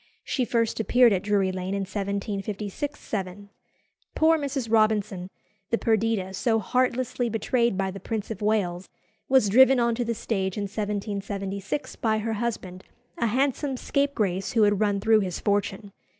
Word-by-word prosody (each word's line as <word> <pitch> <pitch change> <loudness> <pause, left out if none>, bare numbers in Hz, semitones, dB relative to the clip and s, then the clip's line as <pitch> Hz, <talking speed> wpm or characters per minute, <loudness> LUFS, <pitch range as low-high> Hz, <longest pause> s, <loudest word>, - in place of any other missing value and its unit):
She 255 - -1
first 230 -2 0
appeared 240 +1 +5
at 185 - 0
Drury 200 -2 +1
Lane 185 +1 -3
in 200 - -1
1756 200 +6 -4
7. 200 0 -5 0.7
Poor 320 +1 +5
Mrs. 280 -5 -2
Robinson, 210 -4 +2 0.4
the 230 - +2
"Perdita" 220 -4 0
so 225 +3 +1
heartlessly 250 +1 0
betrayed 235 0 +1
by 195 -1 -1
the 195 - -8
Prince 215 +2 -4
of 220 - -6
Wales, 195 -4 0 0.4
was 260 -5 +5
driven 260 +5 +6
on 235 -1 +2
to 240 +2 -1
the 235 0 -2
stage 195 -4 -2
in 205 - -1
1776 200 +2 -4
by 220 -3 +1
her 220 +1 -2
husband, 205 -5 -4 0.4
a 235 - +2
handsome 270 +3 0
scapegrace 215 -11 -1
who 225 -3 +4
had 205 -1 +3
run 205 -2 +1
through 220 +2 +4
his 185 -4 -3
fortune. 205 0 -1
215 Hz, 155 wpm, -26 LUFS, 195-235 Hz, 0.7 s, driven